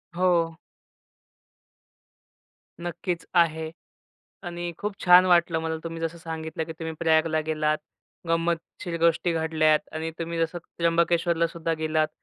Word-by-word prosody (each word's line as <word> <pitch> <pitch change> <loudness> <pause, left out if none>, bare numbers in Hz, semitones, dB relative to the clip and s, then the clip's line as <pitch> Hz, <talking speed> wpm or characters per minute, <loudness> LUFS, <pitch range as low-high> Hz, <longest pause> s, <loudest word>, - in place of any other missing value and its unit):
हो. 170 -2 +2 2.2
नक्कीच 175 0 -3
आहे. 160 -2 +2 0.7
आणि 175 0 -4
खूप 210 0 -3
छान 180 +1 +8
वाटलं 170 -2 +3
मला 160 0 -2
तुम्ही 165 0 -5
जसं 165 +1 -3
सांगितलं 160 -1 -5
की 160 - -7
तुम्ही 160 -1 -4
प्रयागला 160 -1 +3
गेलात. 155 -1 +1 0.5
गंमतशीर 170 +1 -1
गोष्टी 170 +1 +3
घडल्यात 155 -1 +3
आणि 160 +1 -3
तुम्ही 165 0 -3
जसं 165 +1 0
त्र्यंबकेश्वरलासुद्धा 170 0 +1
गेलात 155 0 +1
165 Hz, 115 wpm, -26 LUFS, 160-170 Hz, 2.2 s, छान